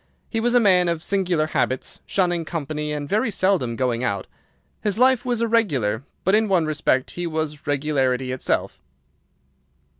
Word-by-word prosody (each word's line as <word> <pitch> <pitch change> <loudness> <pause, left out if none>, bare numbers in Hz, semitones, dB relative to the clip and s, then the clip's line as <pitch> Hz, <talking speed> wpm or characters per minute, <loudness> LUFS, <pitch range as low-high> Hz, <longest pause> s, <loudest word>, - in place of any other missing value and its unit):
He 225 - 0
was 240 +2 +1
a - - +7
man 185 -5 +4
of 170 -1 -1
singular 180 -5 +1
habits, 130 -4 -2
shunning 175 -3 +1
company 150 -2 -4
and 145 -1 -3
very 215 - +1
seldom 185 - +1
going 125 -1 -1
out. 100 -4 -1 0.6
His 210 -1 -1
life 255 0 +4
was 240 -2 0
irregular, 145 - +1 0.2
but 190 - +2
in 220 +1 +4
one 180 -4 +3
respect 145 -3 0
he 175 0 -4
was 155 -3 -4
regularity 135 -3 0
itself. 130 - -2
160 Hz, 155 wpm, -23 LUFS, 135-200 Hz, 0.6 s, a